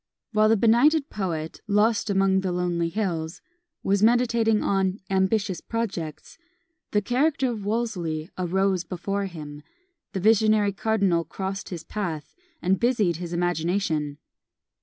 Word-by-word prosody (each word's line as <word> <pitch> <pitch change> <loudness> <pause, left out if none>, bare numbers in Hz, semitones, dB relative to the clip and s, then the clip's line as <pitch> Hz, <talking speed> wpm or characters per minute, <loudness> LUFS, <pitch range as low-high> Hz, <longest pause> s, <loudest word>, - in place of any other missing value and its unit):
While 215 -1 +4
the 225 - +4
benighted 275 +8 +4
poet, 165 -6 -4
lost 215 +2 +2
among 195 -1 +3
the 190 -1 -1
lonely 175 -1 0
hills, 170 -5 -2 0.4
was 200 0 +2
meditating 230 -1 +3
on 195 0 +1
"ambitious 190 -1 +1
projects," 230 - -5 0.5
the 210 -1 +1
character 265 +3 +1
of 215 -4 -5
Wolsey 185 -8 -2
arose 185 0 0
before 195 +3 -3
him; 150 -4 -9 0.5
the 195 - -2
visionary 215 0 +4
cardinal 195 -5 +1
crossed 190 +4 -5
his 175 -4 -6
path, 170 -8 -4 0.3
and 185 +1 +2
busied 220 -9 +2
his 175 -1 -6
imagination. 170 -3 -1
195 Hz, 125 wpm, -25 LUFS, 175-220 Hz, 0.5 s, While